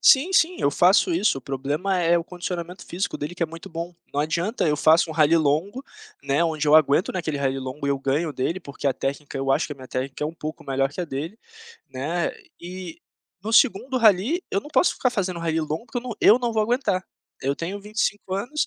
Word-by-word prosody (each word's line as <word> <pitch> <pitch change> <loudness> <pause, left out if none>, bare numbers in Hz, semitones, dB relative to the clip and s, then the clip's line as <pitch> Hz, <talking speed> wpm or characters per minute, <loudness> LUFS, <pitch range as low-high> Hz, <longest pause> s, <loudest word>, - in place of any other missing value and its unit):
Sim 300 +8 +5
sim, 350 0 +3
eu 140 - +3
faço 180 +3 +4
isso, 180 -3 +2
o - - -11
problema 145 +9 -2
é 170 0 +3
o 170 - 0
condicionamento 175 0 -6
físico 180 +3 -3
dele 150 +4 -5
que 175 - -3
é 165 - +2
muito 165 +1 -10
bom, 170 +1 -5 0.2
não 145 - +1
adianta, 170 +8 0
eu 150 -1 +2
faço 160 +2 +4
um - - -4
rally 155 +1 +4
longo, 165 - 0 0.4
né, 140 +3 +1
onde 155 -2 -1
eu 150 - +6
aguento 155 +2 +3
naquele 160 -5 -2
rally 135 -1 -1
longo, 130 +3 -6
eu 140 -1 +1
ganho 145 +4 0
dele 160 +8 -2
porque 140 -2 -6
a 135 - +3
técnica 140 +1 -4
eu 135 0 -1
acho 135 - +2
que 145 - -6
a - - -7
minha 130 -1 -12
técnica 130 +3 -4
é - - +1
um 160 - -6
pouco 155 0 -7
melhor 135 +1 0
que 180 - -5
a - - -1
dele, 160 +7 -5 0.6
né, 155 +7 -1 0.3
e 180 -1 -8 0.4
no 220 +2 -4
segundo 255 +2 +3
rally 225 - +4
eu 195 - +2
não - - -11
posso 290 +5 +3
ficar 250 - +1
fazendo 185 -6 -2
rally 165 -1 0
longo 155 +6 -3
porque 245 - -3
eu - - -7
não 245 -2 -5
eu 220 - +7
não 240 -2 -1
vou 220 -1 +2
aguentar. 210 -5 0 0.4
Eu 140 +1 0
tenho 185 +7 -5
25 205 -2 -2
anos, 245 +10 -1
170 Hz, 230 wpm, -24 LUFS, 145-200 Hz, 0.6 s, eu